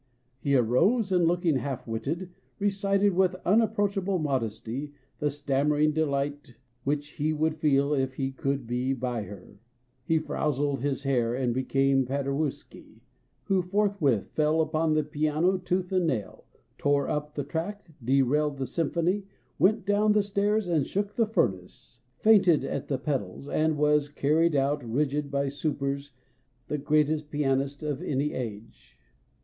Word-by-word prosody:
He 140 Hz, 0 st, +1 dB
arose, 190 Hz, -, +3 dB
and 175 Hz, -2 st, +3 dB
looking 170 Hz, -4 st, +2 dB
half 130 Hz, +1 st, -4 dB
witted, 150 Hz, +12 st, -3 dB, 0.3 s
recited 200 Hz, 0 st, +1 dB
with 185 Hz, 0 st, +2 dB
unapproachable 200 Hz, -2 st, +2 dB
modest} 125 Hz, -8 st, -2 dB
the 140 Hz, +4 st, -5 dB
stammering 145 Hz, +1 st, +1 dB
delight 145 Hz, -3 st, -2 dB, 0.3 s
which 145 Hz, +1 st, -1 dB
he 155 Hz, +1 st, +1 dB
would 155 Hz, +1 st, +1 dB
feel 145 Hz, -2 st, +2 dB
if 130 Hz, -2 st, 0 dB
he 135 Hz, 0 st, -2 dB
could 135 Hz, -1 st, -2 dB
be 125 Hz, +3 st, -1 dB
by 125 Hz, -4 st, -3 dB
Her! 100 Hz, 0 st, -12 dB, 0.4 s
He 160 Hz, +4 st, +2 dB
frowsled 145 Hz, -2 st, -1 dB
his 140 Hz, 0 st, -1 dB
hair 120 Hz, -4 st, +1 dB
and 125 Hz, -2 st, 0 dB
became 135 Hz, +1 st, +2 dB
Paderewski, 140 Hz, +2 st, -4 dB, 0.4 s
who 190 Hz, -1 st, +1 dB
forthwith 180 Hz, -, +1 dB
fell 155 Hz, +1 st, +2 dB
upon 155 Hz, 0 st, +1 dB
the 155 Hz, -, +2 dB
piano 155 Hz, +5 st, +1 dB
tooth 180 Hz, 0 st, -2 dB
and 185 Hz, -3 st, +2 dB
nail, 115 Hz, -9 st, -3 dB, 0.3 s
tore 145 Hz, -1 st, +2 dB
up 150 Hz, 0 st, -3 dB
the 145 Hz, -, -2 dB
track, 200 Hz, +8 st, -4 dB, 0.2 s
derailed 140 Hz, +3 st, +2 dB
the 135 Hz, -, -2 dB
symphony, 170 Hz, -, -1 dB, 0.3 s
went 205 Hz, 0 st, +3 dB
down 210 Hz, +1 st, +3 dB
stairs 205 Hz, +1 st, 0 dB
and 165 Hz, -5 st, +2 dB
shook 200 Hz, +7 st, -2 dB
the 230 Hz, -1 st, +1 dB
furnace, 110 Hz, -, -2 dB, 0.2 s
fainted 190 Hz, -6 st, +5 dB
at -, -, -3 dB
the 135 Hz, -, -1 dB
pedals, 135 Hz, -4 st, -3 dB
and 155 Hz, +1 st, +1 dB
was 150 Hz, 0 st, +2 dB
carried 155 Hz, +3 st, +2 dB
out 140 Hz, +1 st, +1 dB
rigid 140 Hz, +4 st, -1 dB
by 140 Hz, 0 st, 0 dB
supers 140 Hz, 0 st, -2 dB, 0.6 s
the 150 Hz, -, -1 dB
greatest 150 Hz, +1 st, +1 dB
pianist 140 Hz, -1 st, -1 dB
of 145 Hz, -3 st, -2 dB
any 145 Hz, +1 st, -1 dB
age. 115 Hz, -3 st, -7 dB
145 Hz, 145 wpm, -27 LUFS, 135-170 Hz, 0.6 s, fainted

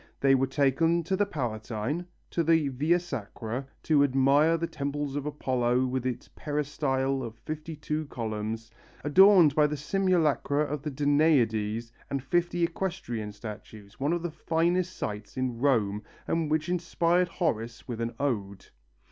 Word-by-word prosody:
They 135 Hz, 0 st, +4 dB
were 135 Hz, 0 st, +3 dB
taken 150 Hz, +5 st, +2 dB
to 190 Hz, +4 st, 0 dB
the 205 Hz, +1 st, +1 dB
Palatine, 120 Hz, -, -3 dB, 0.2 s
to 170 Hz, -, +1 dB
the 160 Hz, -3 st, +3 dB
Via 150 Hz, +7 st, +2 dB
Sacra 125 Hz, -, -5 dB, 0.2 s
to 150 Hz, -3 st, +4 dB
admire 140 Hz, +4 st, +4 dB
the 165 Hz, -, -1 dB
temple 145 Hz, -2 st, -3 dB
of 145 Hz, 0 st, -2 dB
Apollo 130 Hz, -3 st, +1 dB
with 130 Hz, 0 st, -1 dB
its 125 Hz, -, -4 dB
peristyle 135 Hz, -2 st, -1 dB
of 115 Hz, -3 st, -6 dB
fifty 155 Hz, +4 st, -6 dB
two 150 Hz, 0 st, -3 dB
columns, 110 Hz, -2 st, -4 dB, 0.3 s
adorned 180 Hz, 0 st, +7 dB
by 150 Hz, 0 st, +4 dB
the 150 Hz, 0 st, -3 dB
simulacra 155 Hz, -4 st, +1 dB
of 150 Hz, -1 st, -3 dB
the 150 Hz, -, -3 dB
Danaides 125 Hz, -7 st, +2 dB, 0.2 s
and 140 Hz, -2 st, -2 dB
fifty 175 Hz, +4 st, 0 dB
equestrian 165 Hz, -, -3 dB
statues, 105 Hz, 0 st, -10 dB
one 140 Hz, +3 st, +1 dB
of 175 Hz, 0 st, -1 dB
the 175 Hz, -, -2 dB
finest 170 Hz, +3 st, 0 dB
sights 105 Hz, +3 st, -5 dB
in 125 Hz, -2 st, -2 dB
Rome 110 Hz, -7 st, +2 dB, 0.3 s
and 165 Hz, -2 st, 0 dB
which 155 Hz, 0 st, 0 dB
inspired 175 Hz, 0 st, +1 dB
Horace 115 Hz, -, -2 dB
with 120 Hz, -2 st, -4 dB
an 115 Hz, 0 st, -3 dB
ode. 100 Hz, -8 st, -2 dB
140 Hz, 150 wpm, -28 LUFS, 120-165 Hz, 0.3 s, adorned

